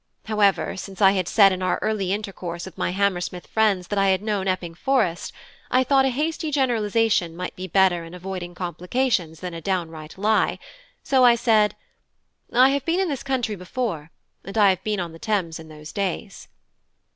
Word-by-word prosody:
However, 210 -2 +1
since 195 0 -8
I 195 -2 +6
had 185 -3 -1
said 200 -3 +6
in 185 0 -3
our 185 -1 +1
early 205 -4 -1
intercourse 185 -4 -4
with 190 - -11
my - - -1
Hammersmith 180 -2 -1
friends 205 -5 +1
that 205 - 0
I 195 - +3
had 190 +1 +1
known 205 -3 -1
Epping 180 -3 -2
Forest, 190 -3 0 0.4
I 255 +1 +3
thought 270 0 +3
a - - +3
hasty 310 +4 -2
generalisation 225 - +1
might 180 +1 -5
be 185 +1 -6
better 185 -1 +3
in 165 +2 -10
avoiding 180 -1 -6
complications 180 - -1
than 180 -1 -5
a 165 - -7
downright 165 -4 -4
lie; 215 +3 +2 0.5
so 265 -2 +3
I 240 -1 +7
said 220 -3 +3 0.8
"I 255 +2 +6
have 280 -1 0
been 335 +3 0
in 380 -2 +1
this 280 -4 -3
country 255 -6 -1
before; 180 -4 -4 0.3
and 195 +4 -7
I 205 -2 +6
have 185 0 -4
been 210 -2 -1
on 175 -2 -4
the 165 - -12
Thames 185 -7 -1
in 160 - -11
those 150 0 -11
days." 195 +1 -4
195 Hz, 190 wpm, -23 LUFS, 175-225 Hz, 0.8 s, I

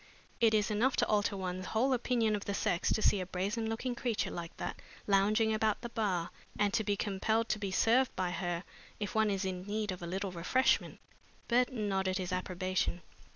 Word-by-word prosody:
It 225 -2 +4
is 210 0 +2
enough 240 +5 +2
to - - +2
alter 205 -1 +1
one's 185 0 -4
whole 255 +5 +2
opinion 235 -3 +1
of 205 - -5
the 200 - -2
sex 175 -3 0
to 215 - -1
see 200 - +4
a - - -3
brazen 205 +5 -2
looking 235 +3 -2
creature 235 -2 -1
like 170 -1 -6
that - - -5 0.2
lounging 210 +3 +3
about 215 -1 +1
the 240 - -5
bar, 190 -7 -1 0.3
and 205 -1 +2
to 225 -1 +2
be 205 -1 +1
compelled 220 +3 0
to 215 - 0
be 200 -1 -2
served 235 +7 +3
by 185 -1 -1
her 175 -1 -2 0.4
if 205 -2 -3
one 220 -1 +3
is 195 -1 -1
in 185 0 -4
need 210 0 -1
of 180 - -6
a 170 - -5
little 190 +2 -3
refreshment." 185 +10 +1 0.5
Burton 245 -3 +1
nodded 190 -1 0
his 185 -1 -3
approbation. 185 -1 -1
205 Hz, 200 wpm, -32 LUFS, 185-225 Hz, 0.5 s, It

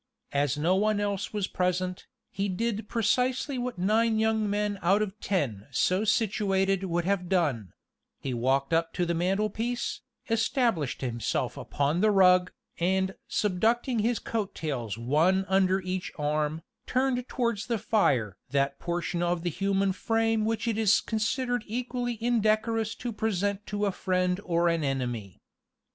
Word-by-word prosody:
As 140 0 +1
no 170 +5 +2
one 210 +1 +2
else 200 -2 -2
was 210 -3 -1
present, 180 0 -2 0.2
he 200 +1 -2
did 215 +2 -2
precisely 250 +4 +1
what 245 -4 -3
nine 220 +4 +2
young 220 -1 +1
men 205 0 -1
out 195 +5 +3
of 210 +1 -6
ten 130 - -2
so 185 +9 +1
situated 195 -3 +1
would 175 -1 -1
have 185 -2 0
done; 140 - 0 0.5
he 130 - -3
walked 135 +5 +1
up 165 0 +1
to 180 - 0
the 170 - 0
mantelpiece, 215 +7 -1 0.3
established 225 - 0
himself 120 -3 -2
upon 145 +5 -1
the 215 - +4
rug, 185 -2 +5 0.3
and 190 +2 +1 0.2
subducting 225 +5 +1
his 235 +2 +1
coat 210 -4 -3
tails 120 -9 -3
one 160 +11 +2
under 190 0 +3
each 185 0 -3
arm, 150 +1 -1 0.2
turned 255 -1 0
towards 235 -5 -1
the 235 -1 0
fire 125 - +1
that 140 0 0
portion 175 0 -2
of 175 -1 0
the 175 - -1
human 195 +2 +1
frame 225 +2 +1
which 225 +1 -1
it 225 -1 0
is 215 -2 +5
considered 245 +2 -1
equally 245 +1 -2
indecorous 225 -1 +1
to 240 -2 -5
present 205 -1 -1
to 205 0 -1
a 200 - +1
friend 185 -1 0
or 170 -1 +2
an 165 -2 +1
enemy. 120 -8 -3
195 Hz, 150 wpm, -28 LUFS, 170-220 Hz, 0.5 s, rug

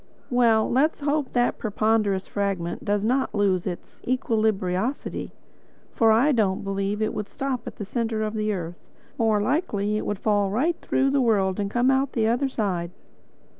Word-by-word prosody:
Well, 230 -3 +4
let 290 +6 +2
us - - -23
hope 290 -1 -1
that 245 -1 +1
the 220 - -3
ponderous 210 -2 +1
fragment 195 -4 -2
does 205 0 0
not 260 +2 0
lose 195 -3 +1
its 175 -2 -7
equilibriosity, 220 -2 -1 0.6
for 225 -1 +4
I 240 +7 +4
don't 205 -7 +1
believe 195 +2 -1
it 215 - -1
would 210 - -4
stop 265 -3 -3
at - - -6
the 205 - -6
centre 225 0 -2
of 215 0 -2
the 215 -1 -1
earth—more 200 +4 -3
likely 210 - 0
it - - -3
would 205 - -1
fall 205 -1 +1
right 280 - +1
through 270 0 +1
the 280 -1 +2
world 200 -5 +2
and 200 -1 -1
come 245 +4 +2
out 270 0 +1
the 225 -3 +1
other 245 +4 +1
side." 185 -8 -2
215 Hz, 175 wpm, -25 LUFS, 200-245 Hz, 0.6 s, Well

